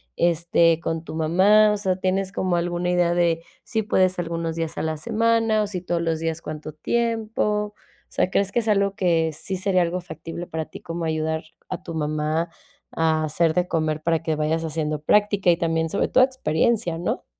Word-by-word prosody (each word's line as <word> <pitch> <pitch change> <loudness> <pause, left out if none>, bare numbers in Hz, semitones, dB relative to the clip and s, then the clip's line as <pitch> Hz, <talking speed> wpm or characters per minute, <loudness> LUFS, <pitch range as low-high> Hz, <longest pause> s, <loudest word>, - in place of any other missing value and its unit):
este, 170 -1 +3
con 165 -1 -3
tu - - -8
mamá, 190 +7 +5
o - - -1
sea, 190 -2 0
¿tienes 190 0 -1
como 185 -2 0
alguna 175 +1 -1
idea 175 -1 +2
de, 170 -1 +1 0.2
si 220 -1 -1
puedes 185 -2 +2
algunos 165 -1 -3
días 165 -1 -3
a - - -1
la 160 0 -1
semana 225 +2 +2
o - - -2
si 185 -3 -4
todos 175 -1 -1
los 165 -1 -1
días 165 0 -2
cuánto 155 0 -6
tiempo?, 215 +2 -1
o - - -32
sea, - - +1
¿crees 200 0 +1
que - - +3
es 225 - -3
algo 200 -1 +2
que 165 -4 +2
sí 190 +5 -4
sería 185 -1 +2
algo 175 +1 0
factible 170 0 -7
para 160 0 -3
ti - - -11
como 165 0 -5
ayudar 160 0 -1 0.3
a - - -5
tu 165 - -7
mamá 155 +2 -1 0.4
a 160 -1 +1
hacer 160 +1 +1
de 180 +1 +1
comer 155 -2 -1
para 165 0 +1
que 160 -1 0
vayas 155 +2 0
haciendo 155 -2 -2
práctica 205 +1 +3
y 170 - +2
también 165 -1 0
sobre 200 - 0
toda 255 - +6
experiencia?, 225 -6 0
¿no? 175 - -3
170 Hz, 200 wpm, -23 LUFS, 160-195 Hz, 0.4 s, toda